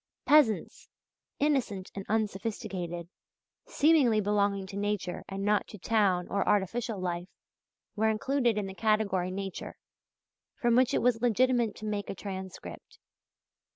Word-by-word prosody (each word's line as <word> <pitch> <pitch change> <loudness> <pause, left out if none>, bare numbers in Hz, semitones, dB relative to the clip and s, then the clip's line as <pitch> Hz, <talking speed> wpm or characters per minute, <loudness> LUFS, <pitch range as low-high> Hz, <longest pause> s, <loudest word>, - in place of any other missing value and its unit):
Peasants, 285 -8 +3 0.5
"innocent" 255 -10 0
and 195 -1 -7
"unsophisticated," 200 -5 -3 0.6
seemingly 285 -8 +4
belonging 200 -1 +1
to 190 - -9
nature 200 -3 -2
and 195 +1 -4
not 210 0 +2
to 210 - -10
town 190 -3 +1
or 200 - 0
"artificial" 210 +2 0
life, 175 -1 -3 0.7
were 220 +1 +2
included 240 +1 +1
in 210 - -1
the 190 - -6
category 200 -3 +1
nature, 195 0 -5 0.8
from 240 -1 +2
which 255 +2 +3
it - - +1
was 240 -2 +2
legitimate 245 -1 +2
to 215 - -8
make 205 -1 -3
a - - -4
transcript. 190 -2 -8
210 Hz, 130 wpm, -29 LUFS, 195-230 Hz, 0.8 s, seemingly